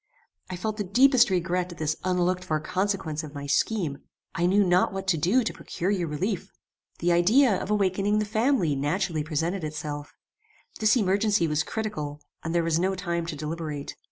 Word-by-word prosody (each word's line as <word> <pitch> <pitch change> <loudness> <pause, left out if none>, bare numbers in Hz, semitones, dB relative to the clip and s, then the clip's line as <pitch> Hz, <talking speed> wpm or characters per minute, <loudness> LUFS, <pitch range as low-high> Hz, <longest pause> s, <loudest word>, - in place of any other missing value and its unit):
I 185 - -4
felt 215 +4 -3
the 205 - -1
deepest 250 +5 +5
regret 180 0 0
at - - -15
this 155 0 -1
unlooked 180 0 +1
for 155 -4 -1
consequence 180 -2 -2
of 150 -1 -9
my 140 0 -5
scheme. 145 0 0 0.3
I 175 +1 +1
knew 200 +3 +4
not 180 0 +3
what 195 0 -5
to 180 - +4
do 195 - +3
to 225 - -2
procure 180 +4 -3
you 180 -4 0
relief. 180 +6 -3 0.5
The 175 +1 +1
idea 210 +8 +4
of - - -5
awakening 200 0 +1
the 215 - +1
family 220 - +1
naturally 155 +3 -1
presented 165 +4 -2
itself. 150 -1 -5 0.6
This 220 +3 +4
emergency 205 -2 +2
was 150 0 +1
critical, 150 -7 -4 0.2
and 165 +1 -3
there 170 - +3
was 165 0 +1
no 190 +2 +1
time 170 -2 -2
to 160 - -4
deliberate. 150 -1 -5
180 Hz, 185 wpm, -26 LUFS, 155-205 Hz, 0.6 s, deepest